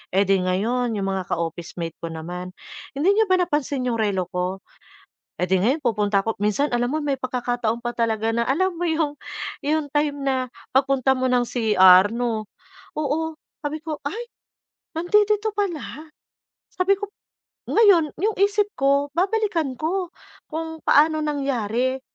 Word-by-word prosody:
Eh, 195 - +5
'di 195 -1 +2
ngayon 230 +6 0
yung 195 -1 -1
mga 190 -1 -3
ka-officemate 165 0 -4
ko 170 - -5
naman, 175 +3 -7 0.4
"Hindi 310 +8 +3
niyo 445 - +4
ba 370 - +4
napansin 295 -7 0
yung 240 -2 -1
relo 190 -4 0
ko?" 185 +1 -3 0.7
Eh, - - -1
'di 185 +1 +2
ngayon 265 +9 +1
pupunta 210 -4 +1
ko 225 - 0
minsan 210 +8 +1
alam 240 0 +1
mo 305 +2 -1
may 280 -2 -1
pagkakataong 245 -2 -2
pa 240 - -1
talaga 225 -2 0
na 235 +1 0
alam 370 +7 +1
mo 350 - 0
yung, 310 -3 -1 0.4
yung 305 +1 0
time 290 -1 0
na 260 -2 0 0.3
pagpunta 270 0 +3
mo 260 0 0
ng 250 -1 +3
CR 195 -6 +6
no? 230 -3 -2 0.5
Oo, 310 +2 -1 0.2
sabi 305 +1 -4
ko, 310 -2 -4
"Ay, 470 +10 -6 0.6
nandidito 420 +5 +2
pala." 320 -5 -4 0.6
Sabi 390 +2 +2
ko. 415 +1 -5 0.6
Ngayon, 365 -9 +4
yung 425 +6 +1
isip 410 +1 +3
ko 280 +1 +1
babalikan 355 - 0
ko 355 +4 -1 0.4
kung 320 0 -5
paano 310 +1 +4
nangyari 260 -4 -1
270 Hz, 150 wpm, -23 LUFS, 220-320 Hz, 0.7 s, CR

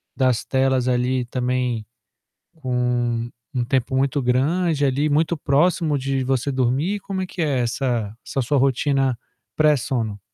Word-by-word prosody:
das 130 -3 +1
telas, 130 -1 +1
ali, 125 0 +1
também 125 -2 -1 0.7
com 130 -5 -4
um 120 -1 0 0.3
um 120 - +1
tempo 130 +1 0
muito 140 +2 +1
grande 145 +5 +1
ali, 140 +2 +1
muito 155 +3 +2
próximo 155 +2 +2
de 135 0 -1
você 135 +1 0
dormir? 135 +10 0
Como 190 -1 -4
é - - -3
que 180 - -8
é 140 -5 +1
essa 120 -3 -1
essa 135 - -1
sua 140 +4 +1
rotina 135 -1 +1 0.4
pré-sono? 125 -8 +1
130 Hz, 145 wpm, -22 LUFS, 125-145 Hz, 0.7 s, muito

